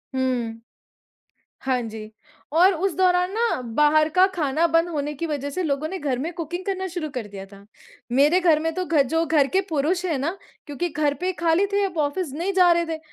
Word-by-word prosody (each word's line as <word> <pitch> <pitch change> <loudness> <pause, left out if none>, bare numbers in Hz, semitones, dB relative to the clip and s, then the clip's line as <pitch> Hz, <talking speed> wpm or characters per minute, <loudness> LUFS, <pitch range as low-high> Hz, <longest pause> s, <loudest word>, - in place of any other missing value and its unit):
हुँ। 245 -3 -1 1.1
हाँ 260 -2 +1
जी 220 -1 -8 0.5
और 365 +4 +6
उस 375 +3 -1
दौरान 360 -1 +2
ना, 460 - 0
बाहर 300 +6 +3
का 370 +1 +6
खाना 310 -1 +1
बंद 330 +1 +2
होने 300 -2 -3
की 335 +4 -4
वज़ह 285 -2 -3
से 365 +6 -3
लोगों 300 -1 -1
ने 380 - -5
घर 275 -6 -2
में 320 +7 -3
कुकिंग 350 +3 -5
करना 380 -1 -2
शुरू 340 -3 -4
कर 250 -5 -5
दिया 195 -1 -9
था। 200 0 -14 0.5
मेरे 295 +8 +4
घर 335 -4 +4
में 325 - 0
तो 370 - -2
घ 315 -4 +3
जो 325 +5 0
घर 300 -3 +3
के 385 - +5
पुरुष 325 +5 0
हैं 325 -6 0
ना, 325 +8 -2 0.3
क्योंकि 300 +5 -3
घर 295 -2 0
पे 370 +1 0
खाली 340 +3 +3
थे, 405 0 +2
अब 360 -4 -4
ऑफ़िस 300 +1 -1
नहीं 345 +7 -2
जा 365 -2 +5
रहे 340 0 +1
थे। 325 -1 -4
320 Hz, 215 wpm, -23 LUFS, 280-360 Hz, 1.1 s, और